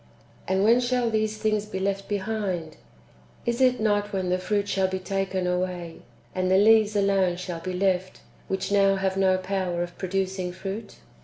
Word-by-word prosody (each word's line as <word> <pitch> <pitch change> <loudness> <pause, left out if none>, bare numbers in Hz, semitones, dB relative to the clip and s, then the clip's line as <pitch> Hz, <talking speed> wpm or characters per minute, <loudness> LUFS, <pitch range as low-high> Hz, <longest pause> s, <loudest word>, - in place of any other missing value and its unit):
^ - - -29 0.4
And 190 +1 +2
when 230 +3 +5
shall 245 -1 +1
these 215 0 0
things 215 -1 0
be 200 - -5
left 195 +1 -2
be 205 - 0
hind? 190 -6 -3 0.7
Is 235 +2 -1
it 255 -1 +4
not 205 -1 +1
when 190 -2 -1
the 180 0 +1
fruit 205 +2 -1
shall 190 -1 +1
be 190 0 -2
taken 190 0 -2
away, 180 -2 -2 0.4
and 185 0 0
the 190 - +5
leaves 215 +1 +5
alone 195 -3 +2
shall 180 -2 -5
be 185 +2 -5
left, 185 0 0 0.3
which 190 +1 -2
now 195 -1 +4
have 190 0 -1
no 190 -1 +3
power 185 -2 -2
of 175 0 -8
pro 185 - -4
ducing 190 -1 -2
fruit 195 +4 -6
195 Hz, 190 wpm, -26 LUFS, 185-205 Hz, 0.7 s, when